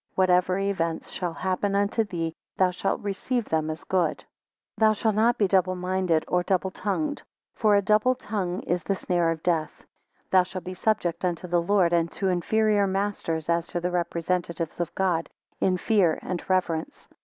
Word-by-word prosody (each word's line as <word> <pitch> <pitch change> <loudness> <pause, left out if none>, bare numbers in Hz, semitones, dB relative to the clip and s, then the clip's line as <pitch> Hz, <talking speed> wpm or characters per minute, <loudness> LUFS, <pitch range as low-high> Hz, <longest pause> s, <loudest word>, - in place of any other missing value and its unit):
Whatever 185 0 +3
events 185 -5 -2
shall 175 -2 -3
happen 190 +2 -1
unto 205 +3 +2
thee, 170 -5 -3 0.2
thou 185 -1 +3
shalt 190 +2 -2
receive 210 +4 -2
them 160 -1 -1
as 155 +1 -5
good. 180 -4 +1
14 - - -18 0.5
Thou 220 -1 +5
shalt 215 +1 0
not 225 +3 +3
be 205 - +3
double 185 -1 +2
minded 180 -3 0
or 180 - +2
double 190 +1 0
tongued; 290 +11 -2 0.3
for 215 -2 +3
a 200 - +3
double 215 +6 +3
tongue 195 -6 -3
is 175 0 -1
the 195 - -1
snare 175 -3 0
of 160 -1 -3
death. 165 -3 -1 0.5
Thou 185 - +6
shalt 180 0 -6
be 185 - -6
subject 185 -3 0
unto 180 -1 -1
the 175 -1 +1
Lord 180 -1 +2
and 170 -1 +2
to 195 - -1
inferior 205 +3 +2
masters 190 -5 -2
as 170 0 +1
to 175 - -3
the 180 +1 -2
representatives 170 -1 -2
of 175 - -3
God, 175 -4 0 0.3
in 185 -1 +2
fear 185 -5 +2
and 180 -2 -4
reverence. 175 -4 -1
185 Hz, 180 wpm, -26 LUFS, 170-200 Hz, 0.5 s, Thou